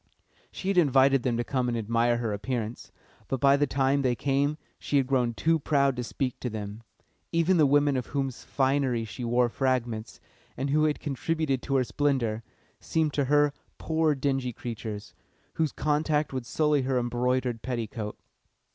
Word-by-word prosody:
She 190 - -4
had 195 -2 +4
invited 135 -3 +4
them 120 -2 0
to 120 - 0
come 130 -1 -1
and 120 -1 -1
admire 115 +2 +1
her 115 -3 -2
appearance, 115 +1 -4 0.4
but 135 - -2
by 140 +1 +5
the 145 +1 +2
time 135 +1 +1
they 125 -2 +1
came 140 +3 0 0.2
she 145 - 0
had 135 - +3
grown 125 -3 +1
too 165 +4 +2
proud 140 -2 +2
to 125 - -3
speak 125 +1 -3
to 125 - -3
them. 105 0 -6 0.5
Even 170 +2 +3
the 155 -3 +5
women 145 0 +3
of 125 -2 -2
whose 135 -3 -3
finery 130 -4 +1
she 110 +4 -7
wore 120 +1 +2
fragments, 120 -3 -2 0.4
and 135 +1 -2
who 155 +1 +3
had 150 -1 0
contributed 145 -1 -1
to 135 - -2
her 130 - +4
splendour, 120 -3 0 0.4
seemed 155 -2 0
to 145 - +1
her 145 +1 +3 0.2
poor 160 -1 +1
dingy 135 -2 -1
creatures, 110 -3 -6 0.4
whose 160 -2 0
contact 150 -1 0
would 130 -3 -4
sully 150 +3 +2
her 130 0 0
embroidered 125 0 0
petticoat. 115 -4 -4
130 Hz, 175 wpm, -27 LUFS, 120-145 Hz, 0.5 s, by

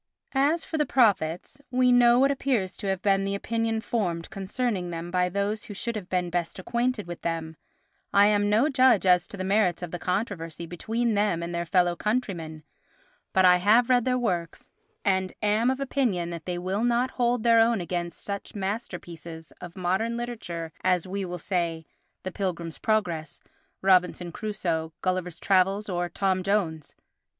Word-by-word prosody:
As 290 +5 +2
for 315 - -3
the 300 - +3
prophets—we 250 - +1
know 240 -1 +6
what 275 +2 +4
appears 255 -9 -1
to 200 - -5
have 190 -1 -1
been 195 -1 +3
the 195 0 -1
opinion 225 +1 -1
formed 175 -8 -2
concerning 195 -1 -2
them 170 0 -5
by 180 0 +2
those 200 +4 -2
who 205 - -8
should 235 +3 -3
have 200 -3 -6
been 180 -2 -1
best 170 -1 -2
acquainted 235 +3 -1
with 175 0 -8
them; 165 -1 -3 0.6
I 200 0 +6
am 205 0 +3
no 220 +7 +4
judge 255 -8 +4
as 180 0 +4
to - - -9
the 185 - -3
merits 190 -3 +1
of 175 - -5
the 175 - -4
controversy 180 -4 -3
between 225 +7 -1
them 205 -5 +1
and 170 0 -5
their 170 0 -2
fellow 175 -1 +3
countrymen, 175 -9 -3 0.7
but 190 0 +4
I 180 0 +7
have 220 +7 +4
read 245 -1 +4
their 250 -1 +2
works 175 -9 -3 0.4
and 190 -2 +1
am 215 +4 +3
of 265 +1 -1
opinion 240 -11 0
that 170 -1 -7
they 180 -1 -2
will 190 +5 -2
not 240 +1 +2
hold 240 -2 0
their 230 -1 +5
own 225 -1 +4
against 175 -1 -4
such 200 +1 -5
masterpieces 175 -6 -6
of 175 -1 -9
modern 190 +6 0
literature 175 -9 -5
as, 180 -2 +2
we 195 +1 -3
will 180 0 -5
say, 170 -2 -2 0.4
The 185 - -4
Pilgrim's 170 -4 -4
Progress, 175 -9 -1 0.4
Robinson 180 -2 +3
Crusoe, 165 -6 -3
Gulliver's 185 -2 -1
Travels 195 +2 +2
or 175 -1 -1
Tom 190 +2 0
Jones. 180 -6 -1
190 Hz, 175 wpm, -26 LUFS, 175-225 Hz, 0.7 s, I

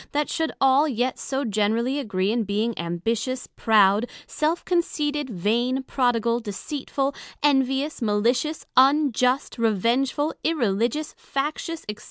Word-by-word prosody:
they 295 +1 +1
should 320 +1 -2
all 270 +3 +4
yet 250 -1 -1
so 270 +1 -2
generally 225 +5 0
agree 195 -6 -1
in 235 0 0
being 210 +3 -1
Ambitious, 225 +9 -2
Proud, 215 0 +4 0.2
Self 315 +3 -1
conceited, 295 -5 -1
Vain, 235 +7 0
Prodigal, 240 -3 +1
Deceitful, 270 +5 -3 0.3
Envious, 270 0 +1
Malicious, 235 +8 0
Unjust, 265 -2 +3
Revengeful, 240 +7 +1
Irreligious, 245 0 0
Factious, 310 +4 -3
&c. 210 0 -4
255 Hz, 115 wpm, -24 LUFS, 220-285 Hz, 0.3 s, all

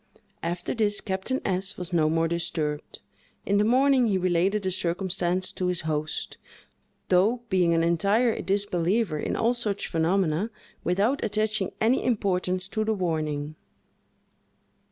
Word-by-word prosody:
After 170 +1 -3
this, 210 -3 0
Captain 190 +8 -2
S—— 190 +1 -2
was 180 0 -4
no 155 -2 +3
more 165 +1 +2
disturbed. 160 -3 -3 0.4
In 200 +1 +2
the - - +4
morning, 255 +2 +4
he 200 -3 +2
related 185 +3 +1
the 190 - 0
circumstance 180 0 -1
to 180 - -2
his 180 -1 +1
host, 155 -1 -3 0.7
though, 210 +7 +3
being 175 -3 +3
an 165 - +2
entire 200 +8 +2
disbeliever 195 -2 0
in - - -2
all 230 +2 +2
such 215 -5 -2
phenomena, 170 +3 +1 0.3
without 200 +10 +1
attaching 215 -2 0
any 235 +4 +2
importance 185 -5 0
to 215 +1 -1
the 220 0 0
warning. 155 -5 -2
185 Hz, 135 wpm, -26 LUFS, 170-210 Hz, 0.7 s, the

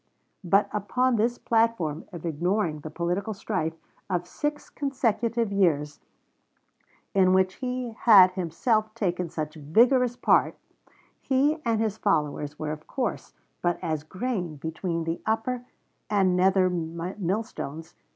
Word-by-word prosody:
But 195 +3 +3
upon 250 +5 +1
this 235 +3 +1
platform 225 -10 0
of 170 -2 -8
ignoring 170 +1 0
the 155 - -7
political 180 +7 -2
strife 185 -6 -2 0.3
of 175 -2 -1
six 295 +10 -3
consecutive 235 -5 -1
years, 150 -7 +1 1.1
in 185 -2 +4
which 190 0 +2
he 250 -2 -3
had 205 -5 +7
himself 215 +5 0
taken 180 -5 -1
such 155 -1 -4
vigorous 235 - +3
part, - - +3 0.7
he 280 +4 +2
and 230 -2 +1
his 220 -1 -1
followers 150 -5 0
were 155 -1 -3
of 155 0 -8
course 250 -5 -3 0.3
but 175 -1 +1
as 160 -3 -1
grain 185 -2 -3
between 165 +3 -3
the 165 +1 -3
upper 240 +3 -1 0.4
and 190 -3 +3
nether 185 +1 +4
millstones. 175 - -4
190 Hz, 125 wpm, -26 LUFS, 165-225 Hz, 1.1 s, had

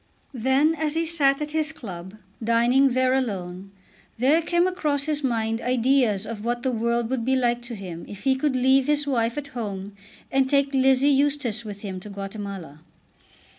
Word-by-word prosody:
Then 265 +6 +2
as 315 -1 -2
he 330 +1 +1
sat 300 -3 +2
at 295 - -6
his 315 0 0
club, 190 - -8 0.3
dining 240 +4 +3
there 255 0 +2
alone, 195 -7 -3 0.5
there 280 +8 +3
came 345 +2 +1
across 300 -6 0
his 300 -1 -1
mind 225 -2 -1
ideas 250 -4 +2
of 215 -2 -6
what 240 +1 -2
the 260 - +1
world 235 0 0
would 255 -3 -1
be 265 +3 +1
like 240 -2 +1
to 240 -1 -7
him 180 -5 -8
if 205 0 -10
he 270 -1 +3
could 265 0 0
leave 265 +1 +3
his 295 0 +2
wife 235 -3 0
at 285 -1 -5
home 205 -5 -5 0.4
and 265 -1 +2
take 280 0 +2
Lizzie 265 +1 +4
Eustace 275 -5 +1
with 205 -2 -8
him 190 -3 -5
to 210 - -10
Guatemala. 195 -6 -7
255 Hz, 180 wpm, -24 LUFS, 220-280 Hz, 0.5 s, Lizzie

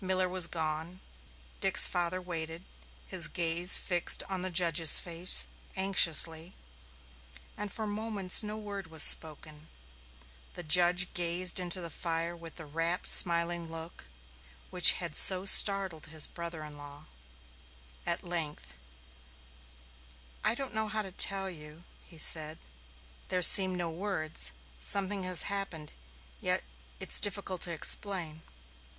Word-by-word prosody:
Miller 185 0 -3
was 180 -2 +1
gone; 160 +2 -7 0.6
Dick's - - +6
father 175 +1 -2
waited, 165 -1 -8 0.4
his - - +2
gaze 170 +1 +4
fixed 175 -2 -2
on 190 -2 -5
the 185 - -5
judge's 170 -3 +3
face 175 +1 +4 0.3
anxiously, 170 -3 +2 1.0
and 210 -1 -8
for 220 - -5
moments 205 -3 0
no 210 0 -8
word 200 -3 -9
was 160 -1 +2
spoken. 155 0 0 0.9
The 175 - -9
judge 180 +2 +2
gazed 175 +1 0
into 180 0 -1
the 170 -1 -8
fire 165 +1 -6
with 165 -1 -14
the 160 - -10
rapt, 165 +4 -5
smiling 170 -1 +1
look 165 - -11 0.6
which 180 -2 +6
had 170 -4 -6
so 185 0 +4
startled 195 -5 +4
his 155 -1 +2
brother 170 -2 -9
in 150 -1 -13
law. 145 +1 -14 1.0
At 170 - -3
length: 155 - -7 1.7
"I 230 - -1
don't 270 -2 -9
know 220 0 -4
how 215 0 -5
to 190 - -12
tell 195 +1 +2
you," 155 -2 -12 0.2
he 165 - -16
said. 155 0 -1 0.7
"There 180 -1 -3
seem 190 +1 +5
no 175 -2 -6
words. 160 - -4 0.3
Something 195 - -1
has 185 -1 +3
happened, 195 -7 -6 0.5
yet - - -3 0.4
it's - - +2
difficult 195 -2 -3
to 175 - +2
explain." 165 -1 -2
175 Hz, 130 wpm, -28 LUFS, 160-190 Hz, 1.7 s, Dick's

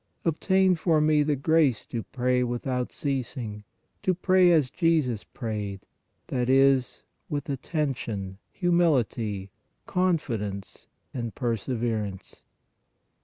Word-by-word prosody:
Obtain 190 +3 +3
for 165 -2 +2
me 150 0 +4
the 145 0 +1
grace 145 -3 +2
to 115 - -4
pray 125 +1 0
without 125 +1 -2
ceas 135 -2 -3
ing, 105 -4 -5 0.4
to 185 - +1
pray 185 0 +4
as 150 -6 +3
Jesus 155 - +1
prayed, 105 -5 -5 0.4
that 125 -1 -1
is, 135 -1 +3 0.3
with 145 +2 -3
attention, 120 - -3
humility, 125 - +1 0.3
confidence 115 - -2 0.3
and 120 -3 -4
perseverance. 115 -4 -3
130 Hz, 105 wpm, -27 LUFS, 115-155 Hz, 0.4 s, me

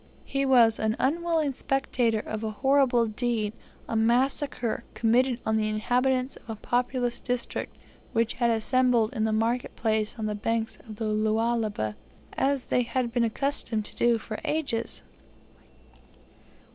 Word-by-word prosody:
He 275 0 -1
was 235 -4 +5
an 220 0 +1
unwilling 320 0 +1
spectator 250 -5 0
of 215 0 -5
a 220 - -1
horrible 260 +1 +3
deed 220 -1 -1 0.3
a - - -3
massacre 240 +1 +1
committed 240 +2 +2
on 220 0 +2
the 215 0 0
inhabitants 255 +4 0
of - - -19
a 225 - -3
populous 245 +2 -1
district 245 -1 -3 0.4
who 230 -1 +2
had 235 -1 +3
assembled 235 +1 +2
in 220 -4 0
the 220 - +1
market 230 +3 0
place 220 -1 0
on 220 - -3
the 210 - -1
banks 225 +2 -2
of 215 - -7
the 220 +1 -4
Lualaba, 215 - 0 0.4
as 275 -1 0
they 250 - +2
had 240 -1 -2
been 240 -1 +2
accustomed 230 -2 -1
to - - -7
do 235 -1 +3
for 215 0 -6
ages. 280 -7 -1
235 Hz, 145 wpm, -27 LUFS, 220-255 Hz, 0.4 s, was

